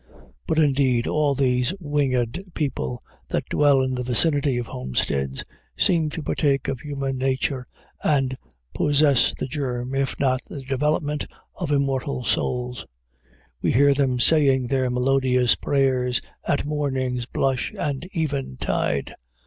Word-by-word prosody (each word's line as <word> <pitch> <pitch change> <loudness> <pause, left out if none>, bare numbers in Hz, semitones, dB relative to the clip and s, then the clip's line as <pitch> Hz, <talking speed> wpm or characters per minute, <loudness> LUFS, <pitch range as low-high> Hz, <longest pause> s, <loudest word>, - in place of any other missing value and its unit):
But, - - 0
indeed, 135 -5 +3
all 150 -2 +1
these 125 +4 +1
winged 140 -3 0
people 125 - -3 0.2
that - - -2
dwell 140 -2 +4
in 130 0 -1
the 125 - -2
vicinity 140 +2 +2
of 120 - -2
homesteads 65 - -2 0.3
seem 165 -4 +2
to 160 +1 -6
partake 140 -4 0
of 135 -2 -2
human 140 -2 -3
nature 130 -1 -1 0.4
and 135 -3 +2 0.4
possess 145 -2 +3
the - - -3
germ, 130 -2 -3
if 135 -1 -1
not 130 -2 +2
the 140 - -7
development, 145 +2 -1 0.3
of - - -4
immortal 140 -2 0
souls. 125 0 -1 0.7
We - - +1
hear 140 +3 +5
them 135 -3 +1
saying 135 -3 +4
their 130 0 0
melodious 125 0 +2
prayers 130 -3 +1 0.3
at 145 - +1
morning's 130 -5 -2
blush 130 -2 0
and 140 0 -2
eventide. 135 - -2
135 Hz, 130 wpm, -23 LUFS, 125-145 Hz, 0.7 s, hear